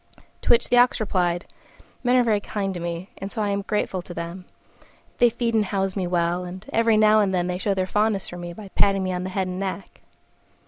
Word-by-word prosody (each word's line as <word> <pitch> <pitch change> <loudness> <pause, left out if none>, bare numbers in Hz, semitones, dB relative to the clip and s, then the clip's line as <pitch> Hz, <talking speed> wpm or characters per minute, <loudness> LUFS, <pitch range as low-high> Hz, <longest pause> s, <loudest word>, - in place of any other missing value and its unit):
To - - -5
which 235 - +4
the 245 - +4
Ox 245 +1 +4
replied, 175 -5 0 0.6
"Men 250 0 +3
are 250 - +5
very 220 -3 +2
kind 200 -1 -3
to 175 - -5
me, 170 +2 -5
and 195 +1 -5
so 225 - -5
I 210 -1 +1
am 200 0 0
grateful 195 -2 -1
to 175 0 -10
them: 170 +2 -6 0.7
they 240 - +6
feed 235 0 -2
and 220 -2 +3
house 195 -1 -1
me 190 -3 -1
well, 175 0 0
and 185 +2 -8
every 230 -1 +4
now 215 0 +6
and 200 -2 +2
then 175 -1 +1
they 180 0 -2
show 200 0 0
their 185 -1 0
fondness 210 0 0
for 175 - -7
me 175 0 -6
by 200 +2 -10
patting 195 0 +2
me 185 0 -1
on 180 0 -3
the - - -3
head 190 0 -1
and 180 0 -4
neck." 195 0 -5
195 Hz, 240 wpm, -24 LUFS, 180-215 Hz, 0.7 s, they